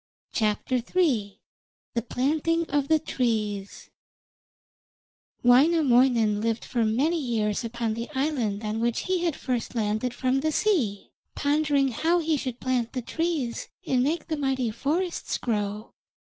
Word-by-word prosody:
THE 230 - 0 0.7
PLANTING 315 +5 +1
OF 285 -1 +1
THE 315 - +5
TREES 215 -9 -2 1.5
Wainamoinen 245 -5 +4
lived 225 0 -1
for 235 -2 0
many 275 +10 +1
years 225 -5 -1
upon 230 -1 -2
the 230 +2 -5
island 250 -8 -1
on 215 +1 -2
which 235 0 0
he 370 -1 0
had 330 -5 0
first 245 -2 -3
landed 220 +2 -1
from 260 +1 +1
the 310 +3 0
sea, 290 - 0 0.2
pondering 285 -2 +2
how 325 +8 +1
he 325 -2 +1
should 255 -4 -4
plant 250 -3 -1
the 255 -2 -3
trees 315 -5 -2 0.2
and 255 -1 +2
make 305 +5 -1
the 315 -2 -2
mighty 265 -4 0
forests 330 - -1
grow. 210 -2 -3
255 Hz, 130 wpm, -26 LUFS, 225-300 Hz, 1.5 s, THE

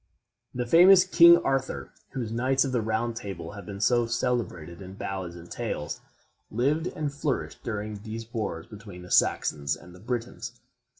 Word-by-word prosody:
The 125 0 -1
famous 180 +7 +8
King 170 -2 +8
Arthur, 135 -1 -1 0.2
whose 120 -5 -3
Knights 130 +4 +2
of 135 - -2
the 125 -2 +1
Round 110 +2 -1
Table 95 -8 -6
have 100 -3 -10
been 100 -1 -6
so 120 +2 +3
celebrated 110 -8 -2
in 95 0 -9
ballads 95 -3 -5
and 85 0 -11
tales, 75 -3 -4 0.5
lived 145 +9 +1
and 150 -4 -3
flourished 145 -1 -3
during 105 -1 -4
these 110 +1 -6
wars 100 -8 -3
between 100 -4 -11
the 90 - -12
Saxons 70 0 +2
and 90 +2 -14
the 90 - -14
Britons. 120 +3 -4
115 Hz, 165 wpm, -27 LUFS, 95-130 Hz, 0.5 s, famous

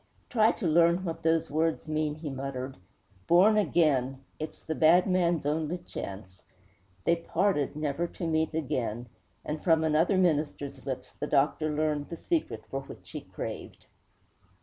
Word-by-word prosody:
'Try 220 -1 +5
to 210 - -5
learn 170 +2 +4
what 165 -2 -4
those 165 -1 +1
words 160 +2 0
mean,' 155 -1 -1
he 155 -1 -6
muttered. 135 -1 -5 0.5
'Born 190 +6 +6
again! 135 -10 +2 0.2
It's 155 - -6
the 160 - -4
bad 170 +3 +5
man's 175 -5 +1
only 155 +3 0
chance.' 95 - -8 0.6
They 170 - +3
parted, 170 -3 0
never 150 +2 -1
to 170 - -6
meet 160 -1 0
again; 120 -6 -2 0.4
and 150 0 -4
from 160 -2 +4
another 160 +5 +3
minister's 150 -5 0
lips 130 -1 -5
the 150 - -4
doctor 150 +2 +2
learned 150 -1 -1
the 170 - -6
secret 305 - -2
for 135 - -2
which - - -12
he - - -5
craved. - - -7
155 Hz, 150 wpm, -29 LUFS, 140-170 Hz, 0.6 s, Born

